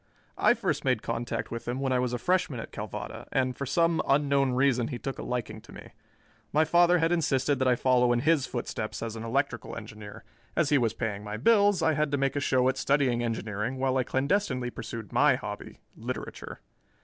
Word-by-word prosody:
I 240 - +5
first 180 - -1
made 125 -5 +1
contact 115 +1 -3
with 115 0 -6
him 125 +2 -2
when 135 -1 -1
I 125 - +2
was 125 -1 0
a 125 - -1
freshman 160 -3 0
at - - -7
Calvada, - - -6
and 130 -1 0
for 140 - -4
some 165 +4 +2
unknown 140 -2 +2
reason 125 -2 +2
he 125 - -4
took 135 +2 -5
a - - -3
liking 110 -3 -4
to - - -16
me. - - -11 0.6
My 155 +1 +3
father 175 +1 +5
had 165 0 +1
insisted 145 -5 +1
that 130 - +2
I 125 - +4
follow 125 0 +3
in 120 0 +2
his 155 -1 +2
footsteps - - -4
as 115 -1 -4
an 110 - -6
electrical 115 -1 -2
engineer; 105 -2 -9 0.3
as - - +2
he 145 - +4
was 115 -2 0
paying 105 -4 -3
my 105 +1 -5
bills, 205 - +4
I 160 -1 +3
had 150 0 +1
to - - +3
make 135 0 0
a - - +1
show 130 -2 +2
at 130 0 +1
studying 135 -4 +1
engineering 115 +1 -3
while 130 0 0
I 130 - +2
clandestinely 130 -2 0
pursued 115 -1 -7
my 135 +2 +5
hobby, 105 -5 -7
literature. - - -6
130 Hz, 210 wpm, -28 LUFS, 120-145 Hz, 0.6 s, I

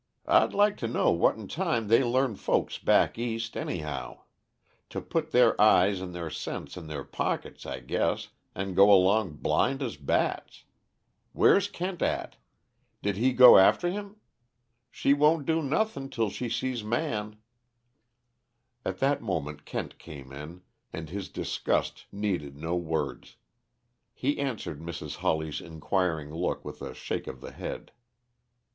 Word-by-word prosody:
I'd - - +4
like 205 +1 +3
to 115 - -3
know 115 - +2
what 85 +5 +3
'n 110 -3 -8
time 155 - -1
they 115 +5 +5
learn 125 -1 +1
folks - - -1
back - - +3
East, 115 -1 -3
anyhow; 75 -7 -4 0.7
to - - -4
put 160 -1 -2
their 125 -5 +5
eyes 100 -2 +5
and 95 -1 -5
their 85 -2 -5
sense - - -5
in 85 -3 -8
their 75 -3 -5
pockets, - - -4
I - - -5
guess, - - -1 0.3
and 95 -1 -3
go 100 +2 +7
along 95 -1 +4
blind 135 - 0
as 120 - -4
bats. 70 -1 -1 0.7
Where's 200 0 +4
Kent 180 -2 -5
at? - - -1 0.7
Did 100 -1 0
he 125 +5 +3
go 125 -3 +9
after 175 - +4
him? 200 +1 -6 0.7
She 140 - +2
won't 150 +1 +3
do 165 0 +1
nothing 145 -1 -1
till 110 -5 -1
she 120 +2 -4
sees 125 -1 -2
Man 105 -3 -2 0.7
" 120 0 -50
At - - -3
that 140 +1 +2
moment 75 -8 -4
Kent - - -5
came 70 -5 -11
in, 75 +6 -9 0.3
and 80 -1 -7
his 100 -1 -5
disgust - - -2
needed 90 -9 -3
no 80 +3 -2
words. 80 -4 -3 0.8
He 140 +3 -1
answered 115 - -3
Mrs. 85 +1 -6
Hawley's 80 -1 -1
inquiring 80 -1 -2
look 85 +2 -2
with - - -8
a - - -6
shake - - -4
of - - -7
the - - -9
head. - - -7
105 Hz, 150 wpm, -28 LUFS, 85-130 Hz, 0.8 s, go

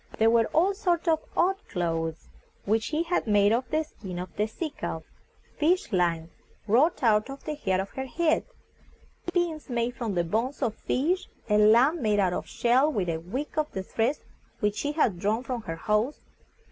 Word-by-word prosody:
There 225 +1 +4
were 230 -1 +4
all 370 +5 +2
sorts 355 -4 0
of 320 -1 +4 0.2
odd 375 +3 +3
clothes, 165 -2 -2 0.4
which 220 +2 +2
she 310 +2 0
had 340 -7 -1
made 205 0 +4
of 250 +2 -1
the 310 0 +1
skin 190 - -9
of 180 -1 -6
the 210 - 0
sea 310 +8 -5
calf; - - -5 0.6
fish 335 -1 +2
lines 170 -3 0 0.3
wrought 260 +9 +3
out 215 +1 +3
of 275 0 -8
the 305 - -3
hair 190 -11 0
of 195 +1 -4
her 265 0 -5
head; 315 +4 +1 0.9
pins 340 -4 -1
made 240 0 -1
from 225 -5 -3
the 175 - +2
bones 230 - -1
of 230 -4 +1
fish; 325 +12 -1 0.2
a 210 - +5
lamp 240 +10 +5
made 210 -3 +2
out 185 -3 +2
of - - -3
a - - -22
shell, 255 +5 +3
with 195 - -1
a 165 - 0
wick 250 - -5
of 305 0 -1
the 190 - -3
threads 230 +8 -1 0.4
which 210 -2 0
she 290 +1 -1
had 225 - +1
drawn 215 +5 0
from 250 -3 -3
her 165 -6 -5
hose. 215 - 0
235 Hz, 195 wpm, -27 LUFS, 200-300 Hz, 0.9 s, a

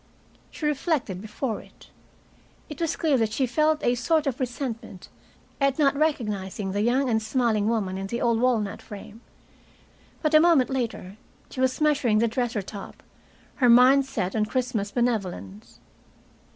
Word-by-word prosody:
She 310 - -6
reflected 285 - -1
before 220 +2 -4
it. - - -19 0.8
It 300 +1 -8
was 330 -1 0
clear 300 -6 +1
that 220 -2 0
she 260 +3 +1
felt 305 +5 +1
a 240 - +3
sort 295 +6 +1
of 265 -3 -2
resentment 240 -6 -5 0.5
at 275 -1 +1
not 280 -2 +3
recognizing 210 -10 -1
the 205 +2 -1
young 255 +5 +2
and 220 -2 +1
smiling 220 -2 0
woman 195 -5 -1
in 195 - -4
the 235 +4 -3
old 235 -2 +1
walnut 230 -5 0
frame, 210 +2 -11 1.0
but 305 0 +1
a 310 - +8
moment 315 -6 +4
later 225 -6 -4 0.3
she 260 - -4
was 260 0 +1
measuring 290 -8 +2
the 230 +2 +3
dresser 235 -2 -2
top, 200 +1 -10 0.5
her 250 -3 +4
mind 260 +3 +6
set 190 -7 -3
on 215 -1 +1
Christmas 245 -5 -2
benevolence. 190 - -3
240 Hz, 155 wpm, -25 LUFS, 210-275 Hz, 1.0 s, a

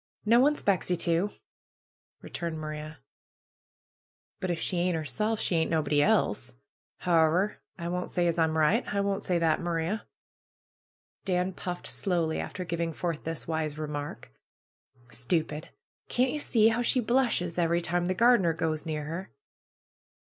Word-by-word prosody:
No 230 +3 +6
one 290 +4 +4
'spects 195 - 0
ye 180 - +2
to!" 170 +4 +1 0.9
returned 170 -2 -4
Maria. 155 0 -6 1.4
"But 185 - -3
if 170 -2 -1
she 180 - -1
ain't 175 0 +1
'erself, 210 - -1
she - - 0
ain't 160 - +1
nobody 150 -3 +2
else. - - +1 0.5
How 170 -2 +4
ever, 185 +6 +1 0.2
I 170 -2 -4
won't 180 +1 -2
say 175 - +1
as 170 0 +1
I'm 160 -1 +2
right. 170 +11 +3
I 200 - 0
won't 200 0 0
say 180 - 0
that, 165 -2 +2
Maria." 170 +5 -2 1.2
Dan 180 0 0
puffed 180 0 -5
slowly, 170 -5 0
after 180 - -5
giving 170 -1 -2
forth 165 -1 -3
this 165 0 -3
wise 160 -2 -2
re 155 0 -3
mark. 145 - -6 0.8
"Stupid! 155 +4 -2 0.4
Can't 250 +1 +2
ye 300 - -3
see 225 -6 +4
how 230 +2 0
she 255 +2 +2
blushes 235 -8 +1
every 170 0 +2
time 175 +1 0
the 185 - 0
gardener 215 -7 +4
goes 160 -1 -2
near 155 -1 -2
her!" 170 +5 -5
170 Hz, 155 wpm, -28 LUFS, 160-190 Hz, 1.4 s, No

